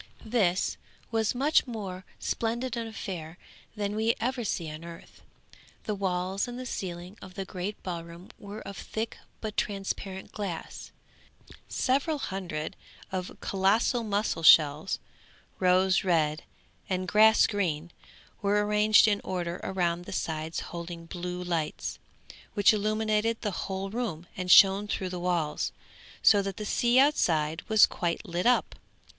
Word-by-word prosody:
This 205 -6 +1 0.3
was 225 0 +1
a - - -4
much 285 +2 +3
more 195 -6 -6
splendid 235 +2 -2
affair 190 -8 -5 0.4
than 205 -1 -2
we 220 +2 +2
ever 250 +1 -1
see 175 -5 -2
on 155 +2 -8
earth. 170 0 -12 0.6
The 215 - -2
walls 190 0 -1
and 245 0 -6
the 255 - -6
ceiling 180 -2 -6
of 185 - -11
the 195 - -4
great 190 +3 -5
ballroom 170 0 -7
were 205 +1 -8
of 200 - -8
thick 220 +4 -4 0.2
but 215 -1 -4
transparent 195 -1 -3
glass. 195 -6 -6 0.8
Several 285 +4 +1
hundreds 185 - -4 0.4
of 185 -1 -4
colossal 205 +5 +2
mussel 205 -4 -1
shells, 155 +1 +6 0.6
rose 185 +1 +4
red 160 -4 +1 0.4
and 185 -1 -1
grass 220 +3 +6
green, 175 -6 -1 0.5
were 205 0 +2
ranged 210 +1 +5
in 205 -1 +2
order 175 -2 -3
round 175 -2 -1
the - - -8
sides 160 -2 -3
holding 170 0 -7
blue 180 +1 -5
lights, 165 -4 -2 0.6
which 205 0 +6
illuminated 215 +1 +1
the 210 - -1
whole 195 +1 -4
room 215 -8 -3
and 185 0 -4
shone 195 +2 +7
through 190 -2 -2
the 180 -1 -5
walls, 175 -4 -1 0.5
so 205 -2 +7
that 195 -1 -4
the 210 - -4
sea 240 +4 +2
outside 165 - +3
was 220 -1 +8
quite 170 -1 -3
lit 175 +5 -1
up. 250 - +3
195 Hz, 140 wpm, -28 LUFS, 175-215 Hz, 0.8 s, was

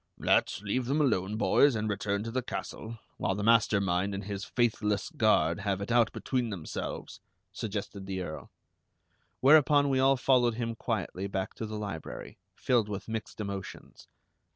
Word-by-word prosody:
"Let's - - +1
leave 120 +5 -1
them 140 +4 +1
alone, 105 -8 +1
boys, 140 +3 +4
and 110 0 -1
return 100 0 -1
to 115 - -5
the 130 +2 -1
castle, 115 -1 -6 0.2
while 95 - 0
the 105 - -3
master 110 -2 +4
mind 95 +1 0
and 100 - -5
his 100 0 -5
faithless 110 - 0
guard 105 - +2
have 100 -1 -1
it 100 +3 -4
out 115 -2 +4
between 125 -3 -2
themselves," 90 -7 -6 0.3
suggested 100 -2 -5
the 95 -1 -3
Earl. 80 -3 -7 0.9
Whereupon 145 0 +6
we 135 -1 +2
all 135 +1 +4
followed 125 -3 +3
him 115 -1 -2
quietly 100 -3 -3
back 95 0 -3
to 110 - -5
the 110 0 -5
library, 100 -6 -7 0.2
filled 120 -5 +1
with 100 -1 -5
mixed 110 -1 -5
emotions. 100 -2 -7
105 Hz, 165 wpm, -29 LUFS, 100-120 Hz, 0.9 s, Whereupon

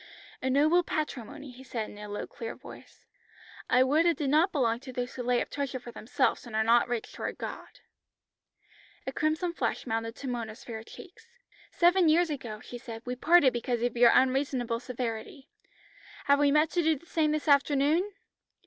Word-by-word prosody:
"A 260 - -1
noble 305 +6 +4
patrimony," 290 -3 -5
he 250 +2 -13
said 230 -4 -4
in - - -13
a 210 0 -8
low 205 - -4
clear 230 -1 -7
voice. - - -14 0.6
"I 250 +1 +5
would 305 +6 +3
it 340 - +2
did 280 -4 -1
not 325 +6 +4
belong 235 -6 +1
to 260 +1 -9
those 250 0 -4
who 255 - -5
lay 245 0 +1
up - - -15
treasure 280 -2 -3
for 240 -1 -10
themselves 245 +3 -1
and 225 - -7
are 220 - +2
not 235 +2 +4
rich 240 -2 -4
toward - - -5
God." - - -8 1.2
A 265 - -3
crimson 310 +5 -1
flush - - -2
mounted 225 -1 -3
to 275 - -7
Mona's 230 -3 -5
fair 225 -2 -7
cheeks. 380 - -14 0.4
"Seven 350 -1 +4
years 330 +1 +3
ago," 235 -7 -5
she 245 - -9
said 230 -2 -9
"we 250 0 -3
parted 290 0 +5
because 240 0 -2
of 245 -1 -1
your 240 0 +6
unreasonable 255 -3 +1
severity. 245 +2 -6 0.7
Have 280 0 +4
we 290 -1 +4
met 300 +2 +3
to 350 - +1
do 320 -1 +2
the 300 - -19
same 315 -3 +1
this 305 +1 -2
afternoon?" 290 +6 +3
260 Hz, 190 wpm, -29 LUFS, 240-305 Hz, 1.2 s, your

